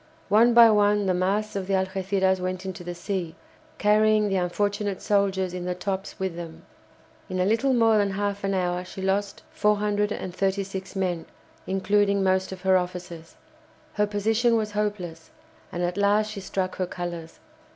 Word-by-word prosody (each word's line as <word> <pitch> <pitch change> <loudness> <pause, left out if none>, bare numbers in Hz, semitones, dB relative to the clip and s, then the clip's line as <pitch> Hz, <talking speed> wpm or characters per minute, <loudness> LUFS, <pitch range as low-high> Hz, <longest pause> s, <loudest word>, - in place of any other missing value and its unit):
One 230 +3 +5
by 230 -1 +9
one 205 -1 +3
the 185 - +2
masts 200 +4 0
of 190 -2 -3
the 195 - +1
"Algéciras" 190 0 0
went 185 +1 -4
into 185 -2 -6
the 175 0 -6
sea, 175 -2 -4 0.4
carrying 215 0 +3
the 195 - 0
unfortunate 205 +2 -1
soldiers 195 -3 0
in 180 -1 -5
the 180 0 -2
tops 190 +1 -4
with 190 -3 -3
them. 170 -1 -8 0.7
In 185 0 -3
a 180 - +2
little 230 +7 +2
more 225 -3 +4
than 200 -1 +2
half 200 +1 -2
an 195 0 0
hour 180 -1 -1
she 185 - -10
lost 195 +1 -1
436 200 -2 -1
men, 180 -3 -2 0.4
including 200 +1 +2
most 190 0 +1
of 185 -1 -8
her 190 0 +4
officers. 180 -2 -6 0.6
Her 210 0 +1
position 220 +3 +1
was 215 -1 -2
hopeless, 195 -6 -3 0.4
and 175 - -3
at 175 +2 -2
last 205 +1 +2
she 210 - -6
struck 190 -1 -3
her 185 - -1
colours. 175 -2 -6
195 Hz, 165 wpm, -25 LUFS, 185-205 Hz, 0.7 s, by